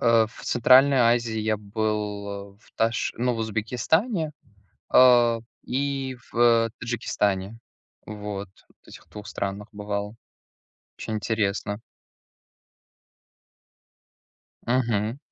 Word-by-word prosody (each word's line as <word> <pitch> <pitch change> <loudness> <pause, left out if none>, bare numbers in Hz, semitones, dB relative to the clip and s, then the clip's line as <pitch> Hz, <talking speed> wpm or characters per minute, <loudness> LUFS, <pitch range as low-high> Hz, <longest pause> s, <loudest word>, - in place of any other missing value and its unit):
Э, 115 -2 +4
в - - -14
Центральной 130 +3 +5
Азии 115 -1 +2
я 110 0 0
был, 105 -1 -3
а 100 0 -8
в - - -25
Таш 115 0 0
ну, 125 +1 0
в - - -5
Узбекистане, 135 - 0 0.6
а, 120 -2 +6 0.3
и 135 0 -2 0.2
в, - - -5
э, 115 -1 +4
Таджикистане. 105 -3 -2 0.5
Вот, 105 -2 -6 0.2
вот - - -28
этих - - -14
2 105 -1 -10
странах 100 +2 -4
бывал. 105 +1 -4 0.8
Очень 110 - -4
интересно. 105 -1 -1 2.9
Мгм. 115 -1 0
110 Hz, 100 wpm, -25 LUFS, 105-120 Hz, 2.9 s, а